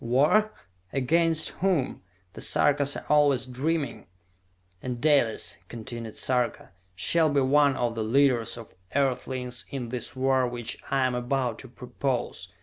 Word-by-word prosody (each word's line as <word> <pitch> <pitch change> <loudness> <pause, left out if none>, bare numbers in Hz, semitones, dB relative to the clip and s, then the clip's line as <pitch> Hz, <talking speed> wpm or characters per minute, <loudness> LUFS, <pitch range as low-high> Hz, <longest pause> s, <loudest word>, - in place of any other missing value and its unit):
"War? 150 - +3 0.4
Against 160 +4 +2
whom? 180 -8 0 0.3
The - - -8
Sarkas 140 -1 +2
are - - -9
always 145 -4 +3
dreaming!" 140 +4 -2 0.7
"And 125 -2 -4
Dalis," 140 -6 +2
continued 115 -1 -7
Sarka, 125 -5 -1 0.2
"shall 160 - +2
be 145 -1 +2
one 140 +1 +4
of 120 -1 0
the 115 -1 -2
leaders 125 0 +2
of 115 -2 -11 0.2
Earthlings 130 -2 -1
in 125 -4 -5
this 125 +1 -5
war 130 -1 +2
which 120 -1 -5
I 135 -1 +2
am 130 - 0
about 125 -1 -1
to 130 - -10
propose! 125 -4 -3
130 Hz, 140 wpm, -27 LUFS, 120-145 Hz, 0.7 s, one